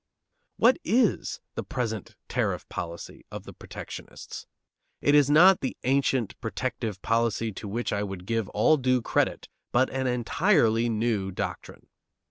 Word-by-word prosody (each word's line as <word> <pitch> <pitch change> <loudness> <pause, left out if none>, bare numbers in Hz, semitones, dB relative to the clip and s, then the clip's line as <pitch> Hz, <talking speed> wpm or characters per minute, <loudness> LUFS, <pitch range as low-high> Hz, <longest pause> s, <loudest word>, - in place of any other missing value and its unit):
What 245 +3 +5
is 235 -1 +1
the - - -3
present 110 -5 -4
tariff - - -1
policy 85 0 -6
of - - -7
the - - -11
protectionists? - - -9 0.5
It 145 - +3
is 145 -2 +5
not 175 +5 +7
the 130 - -3
ancient 130 -4 +1
protective 115 -1 -3
policy 115 -1 +1
to 105 +2 -8
which 115 +4 -2
I 100 - 0
would 95 -3 -5
give 115 -1 -1
all 130 +9 +4
due 130 -2 +1
credit, - - 0 0.2
but 130 +2 +2
an 130 -1 -1
entirely 120 - +2
new 110 -3 0
doctrine. 95 - -5
120 Hz, 140 wpm, -27 LUFS, 110-135 Hz, 0.5 s, not